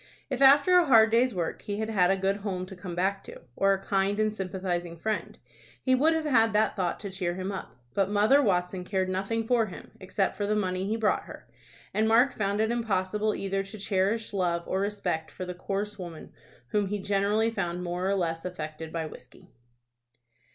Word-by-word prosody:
If 265 0 -2
after 285 +7 +7
a 345 - +2
hard 225 -4 +6
day's 240 0 +3
work 170 -2 -3
he 205 -1 -4
had 220 +1 -2
had 180 -4 +3
a 195 - +3
good 195 +1 0
home 195 -3 -4
to 190 +1 -10
come 180 -1 -7
back 195 +2 0
to, - - -10 0.2
or 195 0 +3
a 195 0 -3
kind 195 +1 +1
and 215 0 +1
sympathizing 185 -3 -3
friend, 215 +5 -3 0.4
he 260 - +1
would 300 +6 +4
have 320 -1 -1
had 225 -6 +3
that 215 +1 +2
thought 180 -3 -1
to 200 -2 -5
cheer 180 -2 -2
him 190 +1 -3
up. 195 - -7 0.2
But 195 +3 +1
Mother 210 +8 +4
Watson 180 -5 0
cared 185 0 -1
nothing 195 +5 -1
for 230 -1 +2
him, 190 - -10
except 190 0 -1
for 205 - -1
the 215 - +1
money 185 -2 -1
he 215 - 0
brought 220 -2 +1
her, - - -11 0.5
and 220 +1 +2
Mark 240 +4 +4
found 200 0 -1
it 220 +1 +2
impossible 210 -2 0
either 195 0 -1
to 195 +2 -9
cherish 205 +2 0
love 175 -3 0
or 190 - -1
respect 200 -5 -2
for 185 - -7
the 180 - -5
coarse 200 +3 -4
woman 170 -3 -8 0.4
whom 205 -1 +1
he 205 +2 -2
generally 205 +3 +1
found 175 -4 -3
more 180 +2 -2
or 200 - +2
less 165 -3 -1
affected 160 -3 -6
by 165 -1 -3
whiskey. 130 -4 -13
195 Hz, 205 wpm, -28 LUFS, 185-215 Hz, 0.5 s, after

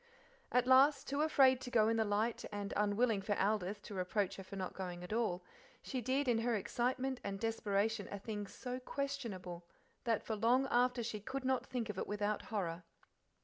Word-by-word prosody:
At 250 0 +3
last, 270 +3 +6
too 280 +2 0
afraid 265 -4 +5
to 255 - -5
go 220 -3 +4
in 225 0 +2
the 220 - +3
light, 215 +2 0
and 205 -1 -4
unwilling 210 +1 +2
for 205 +1 -1
Aldith 205 0 0
to - - -8
reproach 195 +1 -1
her 195 - -7
for 190 +1 -9
not 185 -2 -4
going 180 -2 -5
at 180 - -5
all, 215 -6 0 0.4
she 260 -2 -3
did 265 +4 0
in 235 -2 +3
her 235 0 +1
excitement 250 +5 -1
and 195 0 -3
desperation 220 -1 0
a 200 - -3
thing 205 0 -5
so 250 +4 -5
questionable 235 -11 -4 0.4
that 230 -3 +1
for 220 - -2
long 240 +5 +3
after 245 0 +3
she 220 -2 -3
could 265 +5 -5
not 260 -1 +1
think 240 -4 -2
of 205 -3 -4
it - - -2
without 210 0 -1
horror. 180 -5 -2
220 Hz, 195 wpm, -36 LUFS, 200-250 Hz, 0.4 s, last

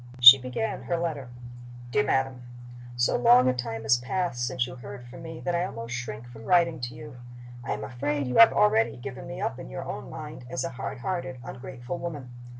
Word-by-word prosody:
She 125 +2 +12
began 130 - -3
her 170 - 0
letter. 155 -7 -3 0.6
"DEAR 140 - +3
MADAM 135 -2 0 0.5
So 120 0 +2
long 125 +1 +6
a 130 - +4
time 115 -3 -4
has 110 +2 +4
passed 125 0 -2
since 125 0 0
you 125 - -8
heard 120 0 -9
from 125 +4 -11
me 165 -1 -8
that 175 - -2
I 170 0 +1
almost 115 -8 -6
shrink 120 -1 -5
from 115 -2 -12
writing 170 -3 +3
to 120 0 -5
you. 115 +1 -10 0.5
I - - -2
am 105 +1 -5
afraid 140 +6 -2
you 125 - -1
have 230 - +9
already 210 - +3
given 130 +1 -8
me 130 - -7
up - - -2
in - - -8
your - - -5
own - - -6
mind 125 - -8
as 130 - -2
a - - -2
hard 130 -1 -6
hearted, 170 -8 -3
ungrateful 130 +5 -7
woman. 145 -7 -6
125 Hz, 210 wpm, -27 LUFS, 120-150 Hz, 0.6 s, She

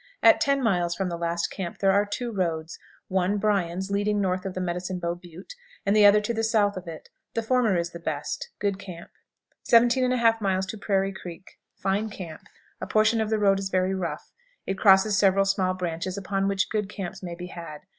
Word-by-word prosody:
At - - +6
ten 275 -1 +2
miles 175 -6 +1
from 190 -2 -2
the 170 - -3
last 170 0 -1
camp 180 -3 -5
there 195 -1 +3
are 200 +1 +2
two 235 +3 -4
roads 165 -5 -2 0.3
one, 190 +2 +1
Bryan's, 190 -2 0
leading 205 +1 +1
north 185 -1 -1
of 185 - -6
the - - -2
Medicine 180 +1 -3
Bow 170 -1 -2
Butte, 175 - -12 0.3
and 200 - +2
the 210 -1 +8
other 205 +1 +6
to 210 +3 -2
the 225 0 -1
south 215 -2 +2
of 185 -1 -7
it. 160 -1 -9 0.3
The 230 - 0
former 230 -5 +2
is 170 0 -2
the 170 - -8
best. 485 - -4
Good 200 -1 -1
camp. 175 -4 -10 0.5
17 240 +2 +4
1/2. 220 -5 +1
Prairie 195 -1 0
Creek. 180 -1 -11 0.2
Fine 200 +3 -1
camp. 175 -6 -8 0.4
A - - -4
portion 220 +1 +3
of 220 - -1
the 220 - +1
road 195 -2 +3
is 195 -1 -3
very 185 0 +1
rough. 170 -5 -4 0.3
It 195 0 -3
crosses 195 0 +5
several 195 0 +4
small 190 -2 +1
branches 180 +1 -3
upon 195 0 -1
which 195 -1 0
good 210 -2 -1
camps 190 -2 -6
may 175 -2 -6
be 175 +1 -7
had. 165 -3 -8
195 Hz, 205 wpm, -26 LUFS, 180-210 Hz, 0.5 s, the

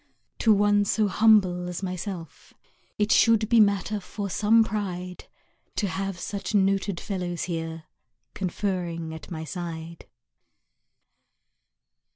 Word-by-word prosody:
To 225 - +4
one 205 0 +4
so 210 +1 +1
humble 190 -4 +3
as 180 +2 -5
myself 180 -3 -6 0.4
It 210 0 +1
should 225 -2 +5
be 235 - +5
matter 200 0 +2
for 200 +1 -6
some 225 +4 +4
pride 185 -4 -4 0.5
To 205 - 0
have 195 +1 -3
such 200 +4 -4
noted 195 -2 +1
fellows 180 -4 -3
here, 165 -2 -4 0.5
Conferring 175 -4 -3
at 160 -2 -10
my 160 -2 -5
side. 165 -1 -7
190 Hz, 115 wpm, -26 LUFS, 175-205 Hz, 0.5 s, should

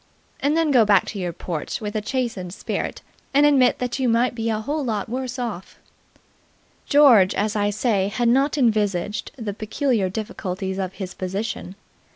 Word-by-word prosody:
And 295 +3 +1
then 325 -2 +2
go 250 -4 +6
back 205 -3 +4
to 205 - -5
your 180 -2 -2
porch 165 -2 -5
with 210 0 -5
a 215 - 0
chastened 215 -7 -3
spirit - - -4 0.3
and 290 +1 +6
admit 270 -4 +4
that 250 +1 -3
you 255 -2 +2
might 235 +2 +2
be 230 -1 -2
a 215 -1 0
whole 290 +7 -2
lot 215 -5 -2
worse 255 +2 -4
off. 225 -7 -5 1.1
George, 250 -10 +6
as 210 +2 0
I 205 -1 +1
say, 205 -2 +1
had 240 +4 0
not 270 +5 +3
envisaged 210 -5 0
the 220 -5 -4
peculiar 215 -1 0
difficulties 190 -2 -4
of 190 -1 -3
his 190 -1 -6
position. 190 0 -4
215 Hz, 175 wpm, -23 LUFS, 195-250 Hz, 1.1 s, go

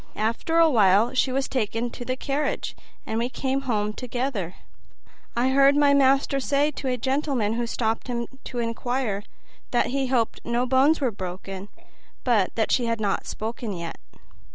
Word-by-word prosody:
After 230 +10 0
awhile 230 - +5
she 255 0 +2
was 270 +1 0
taken 235 -1 -1
to - - -7
the 255 +1 -2
carriage, 280 +2 -2 0.3
and 220 +1 -2
we 240 +2 0
came 265 +1 -1
home 210 -2 0
together. 245 -7 -3 0.8
I 245 +2 +2
heard 275 +1 +5
my 290 -1 +5
master 275 0 +3
say 285 +2 +1
to 275 -1 -5
a 250 -1 0
gentleman 265 -4 0
who 235 +1 -1
stopped 225 0 -1
him 235 -1 -2 0.2
to 245 - -6
inquire, 235 -2 -1 0.5
that 245 - +1
he 270 0 0
hoped 245 -3 0
no 235 +1 0
bones 270 +5 +4
were 255 -4 +2
broken, 190 0 -6 0.5
but 220 -7 +3
that 220 -2 0
she 245 -2 +2
had 230 -1 0
not 205 -2 -1
spoken 225 0 -4
yet." 170 -2 -6
245 Hz, 165 wpm, -25 LUFS, 220-270 Hz, 0.8 s, awhile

